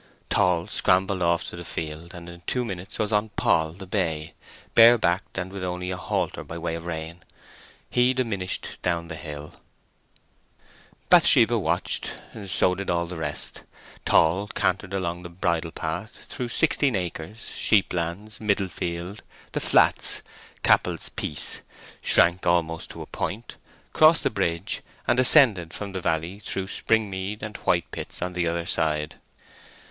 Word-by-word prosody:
Tall 90 Hz, -2 st, +3 dB
scrambled 95 Hz, -3 st, +2 dB
off 85 Hz, 0 st, +2 dB
to -, -, -8 dB
the 85 Hz, -, -7 dB
field, 80 Hz, +2 st, -6 dB
and 85 Hz, -1 st, -9 dB
in 85 Hz, 0 st, -11 dB
two 125 Hz, -1 st, 0 dB
minutes 95 Hz, -1 st, -6 dB
was 110 Hz, -1 st, -1 dB
on 105 Hz, +1 st, +1 dB
Poll, 80 Hz, -1 st, +2 dB
the 95 Hz, +2 st, -10 dB
bay, 85 Hz, -6 st, -2 dB, 0.4 s
bare 115 Hz, +1 st, +8 dB
backed, 90 Hz, -2 st, -1 dB
and 95 Hz, 0 st, -4 dB
with 95 Hz, -2 st, -5 dB
only 90 Hz, 0 st, -3 dB
a -, -, -2 dB
halter 90 Hz, 0 st, -2 dB
by 80 Hz, -, -7 dB
way 85 Hz, 0 st, -3 dB
of 85 Hz, +1 st, -6 dB
rein. 80 Hz, +1 st, -5 dB, 0.7 s
He 125 Hz, +1 st, +2 dB
diminished 105 Hz, -8 st, -2 dB
down 85 Hz, -2 st, -1 dB
the 80 Hz, -, -5 dB
hill. 75 Hz, -2 st, -8 dB, 1.6 s
Bathsheba -, -, +6 dB
watched. -, -, -2 dB, 0.3 s
So 90 Hz, -1 st, +2 dB
did 100 Hz, +1 st, -5 dB
all 85 Hz, -1 st, +1 dB
the 90 Hz, +1 st, -7 dB
rest. 80 Hz, -, -4 dB, 0.4 s
Tall 95 Hz, +6 st, +3 dB
cantered 95 Hz, -1 st, -1 dB
along 90 Hz, -2 st, -2 dB
the 85 Hz, -, -8 dB
bridle 85 Hz, -1 st, -1 dB
path 85 Hz, +7 st, -5 dB
through 125 Hz, -1 st, -5 dB
Sixteen 140 Hz, -2 st, +2 dB
Acres, 90 Hz, +4 st, -5 dB
Sheeplands, 95 Hz, +1 st, 0 dB
Middle 100 Hz, -3 st, +1 dB
Field, 85 Hz, +4 st, -5 dB, 0.3 s
The -, -, -1 dB
Flats, -, -, +3 dB, 0.4 s
Cappel's -, -, +2 dB
Piece, 75 Hz, -, -5 dB, 0.4 s
shrank 85 Hz, +1 st, +4 dB
almost 80 Hz, -2 st, +1 dB
to -, -, -7 dB
a -, -, -10 dB
point, 115 Hz, +4 st, -5 dB, 0.4 s
crossed 155 Hz, +1 st, +6 dB
the -, -, +1 dB
bridge, 85 Hz, -3 st, -1 dB, 0.3 s
and 120 Hz, -, +3 dB
ascended 115 Hz, -, +6 dB
from 100 Hz, -1 st, -5 dB
the 95 Hz, -1 st, -4 dB
valley 85 Hz, +2 st, -1 dB
through 95 Hz, -1 st, -3 dB
Springmead 105 Hz, -2 st, -1 dB
and 105 Hz, -1 st, -5 dB
Whitepits 85 Hz, 0 st, -2 dB
on 90 Hz, 0 st, -3 dB
the 90 Hz, -1 st, 0 dB
other 85 Hz, 0 st, -1 dB
side. 75 Hz, -3 st, -1 dB
90 Hz, 150 wpm, -25 LUFS, 85-100 Hz, 1.6 s, bare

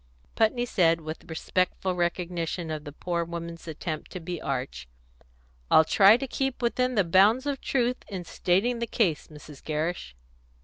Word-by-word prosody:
Putney 235 Hz, +2 st, +2 dB
said, 165 Hz, -7 st, +2 dB
with 155 Hz, +2 st, -8 dB
respectful 185 Hz, +3 st, -1 dB
recognition 175 Hz, -1 st, -2 dB
of 155 Hz, -1 st, -5 dB
the 145 Hz, -, -7 dB
poor 170 Hz, +3 st, -2 dB
woman's 170 Hz, 0 st, -7 dB
attempt 155 Hz, 0 st, -5 dB
to 185 Hz, -, -6 dB
be 175 Hz, 0 st, -5 dB
arch, 130 Hz, -, -4 dB, 0.8 s
"I'll 160 Hz, -, +6 dB
try 200 Hz, +6 st, +6 dB
to 270 Hz, -, -4 dB
keep 270 Hz, 0 st, -2 dB
within 250 Hz, +1 st, +1 dB
the 200 Hz, -, +4 dB
bounds 200 Hz, +9 st, +4 dB
of 280 Hz, -2 st, -2 dB
truth 250 Hz, -1 st, 0 dB
in 185 Hz, -3 st, -5 dB
stating 195 Hz, +8 st, 0 dB
the 235 Hz, -, -2 dB
case, 180 Hz, -10 st, 0 dB
Mrs. 150 Hz, -2 st, -13 dB
Gerrish." 155 Hz, -, -3 dB
175 Hz, 160 wpm, -27 LUFS, 160-220 Hz, 0.8 s, I'll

